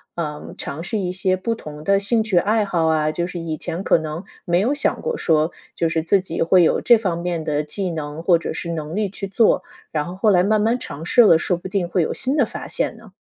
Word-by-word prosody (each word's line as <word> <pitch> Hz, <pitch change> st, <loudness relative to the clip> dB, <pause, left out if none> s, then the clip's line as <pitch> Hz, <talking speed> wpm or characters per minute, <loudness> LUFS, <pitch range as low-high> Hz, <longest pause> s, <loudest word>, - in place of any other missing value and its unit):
呃， 150 Hz, -3 st, -5 dB
尝 155 Hz, +4 st, -5 dB
试 195 Hz, +5 st, -2 dB
一 180 Hz, -3 st, -2 dB
些 185 Hz, 0 st, 0 dB
不 230 Hz, +5 st, -2 dB
同 150 Hz, -5 st, -10 dB
的 200 Hz, 0 st, +4 dB
兴 210 Hz, +3 st, +2 dB
趣 195 Hz, -5 st, +1 dB
爱 215 Hz, +4 st, +2 dB
好 170 Hz, -4 st, 0 dB
啊， 155 Hz, -1 st, +2 dB
就 175 Hz, -, -1 dB
是 180 Hz, -1 st, -6 dB
以 165 Hz, -2 st, -3 dB
前 165 Hz, +4 st, -5 dB
可 -, -, +5 dB
能 160 Hz, +3 st, -6 dB, 0.2 s
没 175 Hz, 0 st, +1 dB
有 235 Hz, +9 st, +1 dB
想 295 Hz, -, 0 dB
过 475 Hz, 0 st, -2 dB
说， 155 Hz, -1 st, +1 dB, 0.2 s
就 165 Hz, -, +1 dB
是 160 Hz, 0 st, -1 dB
自 195 Hz, +4 st, +3 dB
己 180 Hz, -3 st, -5 dB
会 180 Hz, +2 st, +5 dB
有 165 Hz, -, +3 dB
这 240 Hz, -, +6 dB
方 185 Hz, -6 st, -2 dB
面 170 Hz, -2 st, -3 dB
的 150 Hz, -1 st, 0 dB
技 185 Hz, +5 st, -3 dB
能 155 Hz, -2 st, -5 dB
或 170 Hz, 0 st, +4 dB
者 -, -, -5 dB
是 170 Hz, -, -5 dB
能 160 Hz, +2 st, -4 dB
力 210 Hz, -2 st, 0 dB
去 195 Hz, +1 st, -6 dB
做， 215 Hz, +3 st, +3 dB, 0.3 s
然 150 Hz, -2 st, -1 dB
后 175 Hz, -, -6 dB
后 215 Hz, -, +3 dB
来 180 Hz, -3 st, +4 dB
慢 215 Hz, +2 st, +2 dB
慢 225 Hz, +3 st, +2 dB
尝 160 Hz, -, -8 dB
试 245 Hz, -, +5 dB
了， 205 Hz, -8 st, +7 dB
说 180 Hz, +2 st, 0 dB
不 175 Hz, +2 st, -8 dB
定 185 Hz, -2 st, -1 dB
会 180 Hz, -, 0 dB
有 160 Hz, -, -1 dB
新 265 Hz, +2 st, 0 dB
的 285 Hz, -5 st, +3 dB
发 -, -, -8 dB
现 -, -, -2 dB
呢。 -, -, -16 dB
175 Hz, 280 characters per minute, -21 LUFS, 160-200 Hz, 0.3 s, 了